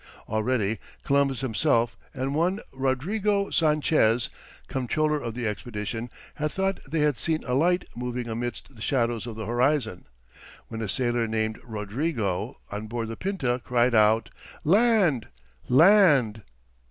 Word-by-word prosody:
Already, 110 -1 0 0.2
Columbus 140 -2 +2
himself, 120 -1 +1 0.2
and 135 -1 -3
one 175 +6 +1
Rodrigo 195 - 0
Sanchez, 150 -7 +3 0.4
comptroller 150 +4 0
of 115 -1 -5
the 120 -1 -3
expedition, 110 +1 -4 0.2
had 150 0 -2
thought 195 +3 -1
they 155 +1 0
had 150 -4 +2
seen 160 -1 -1
a 125 - -3
light 175 +7 +2
moving 125 0 -4
amidst 120 +3 -5
the 110 - -13
shadows 120 -1 0
of 115 - -6
the 110 -1 -5
horizon, 125 -3 0 0.6
when 115 -1 -5
a 110 - -3
sailor 120 0 0
named 110 0 -1
Rodrigo, 110 - -2
on 105 +2 -5
board 115 0 -3
the 115 - -4
Pinta, 135 - -1
cried 125 0 +2
out, 110 -2 +4 0.3
"Land, 195 - +3 0.4
land." 145 - +5
125 Hz, 135 wpm, -26 LUFS, 115-155 Hz, 0.6 s, land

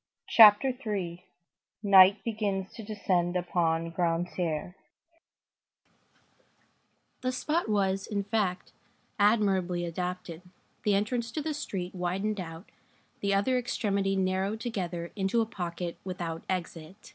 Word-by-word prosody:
CHAPTER 225 +4 +7
III—NIGHT 190 0 +2
BEGINS 205 -4 -2
TO - - -8
DESCEND 190 -5 -1
UPON 165 -2 0
GRANTAIRE 170 -1 -1 2.5
The 255 0 0
spot 300 +2 -1
was, 195 -2 +1
in 200 -2 -2
fact, 200 -3 -1 0.5
admirably 195 -5 +2
adapted, 180 0 -5 0.4
the 205 -1 +2
entrance 230 +3 -1
to 310 - -2
the 315 0 -2
street 190 -11 -4
widened 195 +4 -2
out, 165 +1 -8 0.5
the 200 0 +1
other 250 +6 +2
extremity 200 -5 -1
narrowed 190 +3 0
together 180 -7 -4
into 195 +3 +1
a 225 - +2
pocket 175 -4 -5
without 170 -3 -4
exit. 180 +1 -5
190 Hz, 110 wpm, -29 LUFS, 175-210 Hz, 2.5 s, CHAPTER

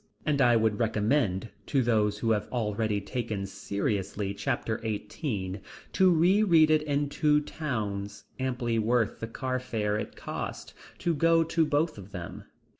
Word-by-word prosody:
And 145 -2 +2
I 120 -2 +5
would 110 -2 +2
recommend 110 -2 +1 0.2
to 135 -3 +2
those 105 -3 +2
who 115 +1 0
have 105 -2 0
already 110 -3 -1
taken 105 -1 -3
seriously 100 0 -2
chapter 110 +2 -2
eighteen, 105 - -3 0.3
to 190 -1 +5
reread 170 -1 +5
it 155 -1 +4
in 145 -1 0
two 150 +1 +3
towns, 110 -10 -4 0.2
amply 125 -3 -1
worth 115 0 +1
the 115 - -4
car 130 +2 -2
fare 105 -4 -1
it - - -6
costs - - -6 0.2
to 170 - 0
go 165 +2 +4
to 165 0 +1
both 150 -3 0
of 95 0 -11
them. 90 -3 -7
115 Hz, 150 wpm, -28 LUFS, 105-150 Hz, 0.3 s, I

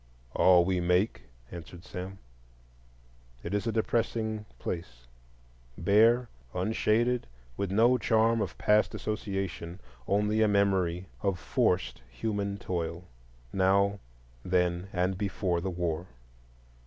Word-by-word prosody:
"All 90 -2 +6
we 95 0 +1
make," 90 - +1 0.3
answered 85 +1 -10
Sam. 95 +1 -7 1.3
It 85 - -4
is 105 +3 -1
a - - +1
depressing 110 -1 -1
place,—bare, 60 - -1 0.3
unshaded, 110 +5 +1 0.3
with 100 -2 -2
no 120 +5 +4
charm 115 0 +3
of 95 -5 -3
past 105 0 +3
association, 95 -4 -4 0.3
only 105 +2 +2
a 110 - +5
memory 95 -3 +2 0.2
of 100 -3 0
forced 85 -8 0
human 100 - -2
toil,—now, 85 +3 -1 0.4
then, 90 0 +1
and 90 +1 0
before 95 -4 -1
the 95 - -2
war. 85 -1 -2
95 Hz, 105 wpm, -29 LUFS, 85-105 Hz, 1.3 s, All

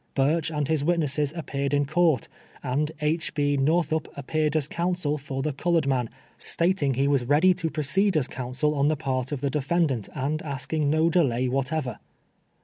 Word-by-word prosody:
Burch 150 +4 +2
and 150 -3 -2
his 155 -2 0
witnesses 150 -3 +1
appeared 140 -3 -2
in 145 0 +2
court, 155 -3 +2 0.4
and 145 +4 0
II. 155 +3 +2 0.2
B. 145 -1 +1
j^ortliup 160 +2 +1
appeared 155 +2 -1
as 150 -3 +1
counsel 170 -3 -1
for 135 -1 -4
the 155 0 -1
colored 165 +1 +1
man, 130 -4 0 0.3
stating 165 -6 0
he 135 +2 +2
was 140 -3 +2
ready 155 +8 +4
to 165 -2 -2
proceed 160 +5 +1
as 140 - +1
counsel 130 +4 -2
on 140 -1 +2
the 155 0 +1
part 130 -3 -2
of 145 -3 -3
the 140 -1 0
de 150 - 0
fendant, 140 - 0
and 150 +3 -1
asking 140 +1 -2
no 160 +2 +3
delay 130 -8 +2
whatever. 135 -1 -2
150 Hz, 180 wpm, -26 LUFS, 135-160 Hz, 0.4 s, ready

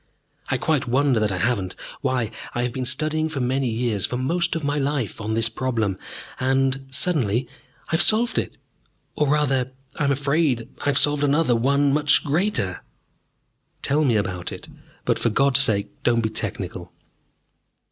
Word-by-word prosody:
"I - - +1
quite 150 -5 0
wonder 130 0 +2
that 105 -1 +1
I 95 - -2
haven't. 100 -4 -1 0.3
Why, 130 -5 -1 0.2
I 120 - 0
have 125 -1 -2
been 130 0 -3
studying 155 +4 0
for 150 -3 -4
many 130 +1 0
years 110 -4 -1
for 125 - -3
most 170 +6 0
of 165 - -3
my 145 +1 0
life 135 -7 -2
on 110 +1 -2
this 115 0 +2
problem. 115 -5 -2 0.4
And, 135 +1 +1
suddenly, 130 - +2 0.4
I - - -7
have 160 - +3
solved 230 +3 +2
it! - - -5 0.6
Or, 150 - 0
rather, 135 -3 +1 0.3
I 150 - +1
am 140 - +2
afraid 140 -3 +1
I - - -7
have 145 -2 +2
solved 145 0 +3
another 145 -3 +3
one 140 +4 +2
much 150 0 +3
greater." 150 - 0 1.0
"Tell 150 +3 +2
me 125 -6 +2
about 90 -4 -2
it, - - -9 0.4
but - - +1
for - - +1
God's 135 +3 +4
sake 110 -4 +4
don't 120 -3 +2
be 110 - -1
technical." - - -3
130 Hz, 170 wpm, -23 LUFS, 115-145 Hz, 1.0 s, God's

